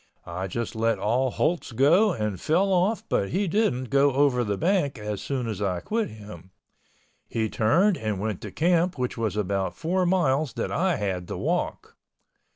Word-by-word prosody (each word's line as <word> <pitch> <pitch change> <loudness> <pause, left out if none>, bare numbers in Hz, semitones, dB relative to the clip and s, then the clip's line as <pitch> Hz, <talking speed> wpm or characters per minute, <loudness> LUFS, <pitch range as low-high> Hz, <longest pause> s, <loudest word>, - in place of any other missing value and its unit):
I 90 +3 -4
just 115 +5 -4
let 115 +1 +1
all 125 +5 +1
holts 165 +4 -1
go 165 - +4
and 105 - -3
fell 190 +5 +2
off 190 +5 +1
but 100 - 0
he 195 +2 0
didn't 160 - 0
go 140 0 +4
over 135 -3 +3
the 105 -3 -2
bank 170 -6 +1
as 105 -1 -4
soon 130 -4 -3
as 105 -3 -4
I 95 -3 0
quit 220 - -2
him. 105 -4 -11 0.8
He 110 -2 -2
turned 175 - +3
and 110 -3 -2
went 105 -2 -3
to - - -6
camp 175 +1 +1
which 125 -1 -2
was 110 -3 -2
about 100 -2 -1
four 180 +2 0
miles 155 -6 +1
that - - -3
I 185 -1 +1
had 95 -6 -3
to - - -5
walk. - - -2
125 Hz, 180 wpm, -25 LUFS, 105-175 Hz, 0.8 s, go